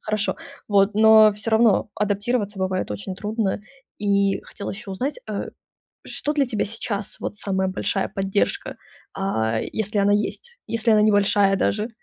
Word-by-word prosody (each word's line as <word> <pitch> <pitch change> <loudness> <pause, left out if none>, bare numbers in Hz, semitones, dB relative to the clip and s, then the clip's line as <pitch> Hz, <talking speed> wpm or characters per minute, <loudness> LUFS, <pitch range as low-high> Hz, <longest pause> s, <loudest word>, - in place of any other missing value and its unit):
Хорошо, 215 -1 -1 0.3
вот, 200 0 +3
но 220 0 +7
всё 210 +2 -3
равно 220 -2 +4
адаптироваться 205 0 -1
бывает 185 - -1
очень 105 - -5
трудно. 210 -1 -2 0.4
И 200 -1 +1
хотела 200 - -7
ещё 200 0 -8
узнать, 270 - -3
э, - - -4 0.6
что 295 - -2
для 290 -3 +2
тебя 225 -4 -1
сейчас, 205 -1 -4
вот, - - -4
самая 190 -2 -1
большая 190 +1 -1
поддержка, 195 +1 -1 0.4
а, 110 - -1
если 215 -1 -2
она 200 0 +3
есть? 475 - -2
Если 230 0 +1
она 210 -1 +5
небольшая 205 -1 +3
даже? 210 +3 0
205 Hz, 150 wpm, -23 LUFS, 195-220 Hz, 0.6 s, но